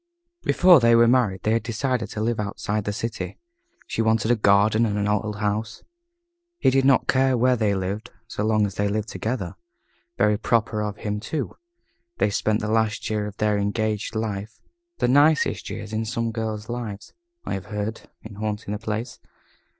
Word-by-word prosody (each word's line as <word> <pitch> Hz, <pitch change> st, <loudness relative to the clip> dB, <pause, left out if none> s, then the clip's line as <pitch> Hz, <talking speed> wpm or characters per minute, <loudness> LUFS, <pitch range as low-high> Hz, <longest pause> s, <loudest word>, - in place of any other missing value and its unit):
Before 180 Hz, -4 st, +6 dB
they 115 Hz, -1 st, +5 dB
were 115 Hz, 0 st, +6 dB
married 115 Hz, -6 st, +2 dB
they 110 Hz, -, +1 dB
had 115 Hz, +1 st, +2 dB
decided 115 Hz, 0 st, -2 dB
to 110 Hz, -, -4 dB
live 115 Hz, 0 st, 0 dB
outside 105 Hz, 0 st, -2 dB
the 105 Hz, -, -1 dB
city. 115 Hz, +2 st, -4 dB, 0.5 s
She -, -, -2 dB
wanted 110 Hz, +1 st, +2 dB
a -, -, +5 dB
garden 105 Hz, +1 st, +4 dB
and 105 Hz, -3 st, 0 dB
an 105 Hz, 0 st, 0 dB
old 105 Hz, 0 st, 0 dB
house. 105 Hz, +1 st, -2 dB, 0.7 s
He 240 Hz, -, +3 dB
did 135 Hz, 0 st, +3 dB
not 135 Hz, -1 st, +4 dB
care 130 Hz, -1 st, +3 dB
where 125 Hz, +2 st, +3 dB
they 105 Hz, -4 st, +1 dB
lived 100 Hz, +4 st, -3 dB, 0.2 s
so 105 Hz, -, -3 dB
long 110 Hz, -1 st, +3 dB
as 100 Hz, -, -4 dB
they 100 Hz, +2 st, 0 dB
lived 105 Hz, +2 st, -2 dB
together. 110 Hz, -5 st, -3 dB, 0.6 s
Very 105 Hz, -1 st, +3 dB
proper 115 Hz, -1 st, +1 dB
of 105 Hz, -1 st, -3 dB
him, 105 Hz, -1 st, -3 dB
too. 140 Hz, +6 st, -4 dB, 0.6 s
They 105 Hz, -, +2 dB
spent 110 Hz, +1 st, 0 dB
the 105 Hz, -, -2 dB
last 110 Hz, 0 st, 0 dB
year 105 Hz, -1 st, -1 dB
of 105 Hz, +1 st, -9 dB
their 105 Hz, -1 st, +1 dB
engaged 105 Hz, +2 st, -1 dB
life, 110 Hz, 0 st, -4 dB, 0.4 s
the -, -, +1 dB
nicest 145 Hz, +4 st, +3 dB
year 110 Hz, -, -5 dB
of 110 Hz, +1 st, -3 dB
some 115 Hz, 0 st, -1 dB
girls' 110 Hz, -1 st, -4 dB
lives, 115 Hz, -4 st, -6 dB, 0.3 s
I -, -, -3 dB
have 95 Hz, -, -4 dB
heard 105 Hz, +1 st, -4 dB
in 110 Hz, -2 st, -10 dB
hunting 105 Hz, 0 st, -3 dB
the 105 Hz, -, -3 dB
place. 110 Hz, +1 st, -4 dB
110 Hz, 185 wpm, -24 LUFS, 105-115 Hz, 0.7 s, Before